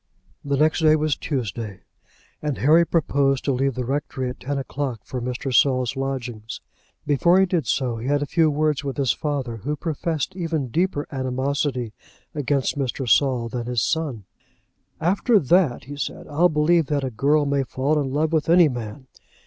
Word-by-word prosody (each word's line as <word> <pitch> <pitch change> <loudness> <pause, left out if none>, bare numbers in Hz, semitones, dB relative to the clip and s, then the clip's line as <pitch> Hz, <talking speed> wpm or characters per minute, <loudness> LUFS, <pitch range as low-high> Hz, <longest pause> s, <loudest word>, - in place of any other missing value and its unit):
The 140 -1 -1
next 155 +4 +3
day 155 -1 +5
was 155 -2 +1
Tuesday, 110 - -4 0.6
and 150 -3 -2
Harry 160 +5 +4
proposed 140 -4 +1
to 140 - +2
leave 135 +1 0
the 125 -1 -3
rectory 130 -1 -2
at - - -12
ten 140 +1 -3
o'clock 135 -3 -4
for 125 - -5
Mr. 125 +2 -3
Saul's 130 -1 +3
lodgings. 125 -5 -4 0.5
Before 170 +6 +4
he 190 - +5
did 175 -7 -1
so, 125 -4 0
he 115 +3 -5
had 145 +1 +1
a - - -2
few 160 +2 +2
words 150 -1 0
with 140 -2 -4
his 135 -4 +2
father, 135 -6 -3
who 145 +8 -3
professed 160 +2 -3
even 165 -7 -2
deeper 165 0 0
animosity 130 -2 -2 0.4
against 145 -1 -1
Mr. 130 -1 -2
Saul 125 0 +3
than 120 0 -5
his 120 -2 0
son. 150 -10 -1 0.8
"After 195 +7 +3
that," 165 -5 +2
he 145 +4 -8
said, 145 - -5
"I'll 160 +4 +3
believe 155 +1 +2
that 145 -2 -1
a 130 - -2
girl 145 +6 +2
may 140 -1 +1
fall 135 +3 0
in 140 -2 -1
love 155 +3 0
with 160 -1 +1
any 170 -2 +6
man! 120 +1 -6
140 Hz, 180 wpm, -23 LUFS, 130-155 Hz, 0.8 s, any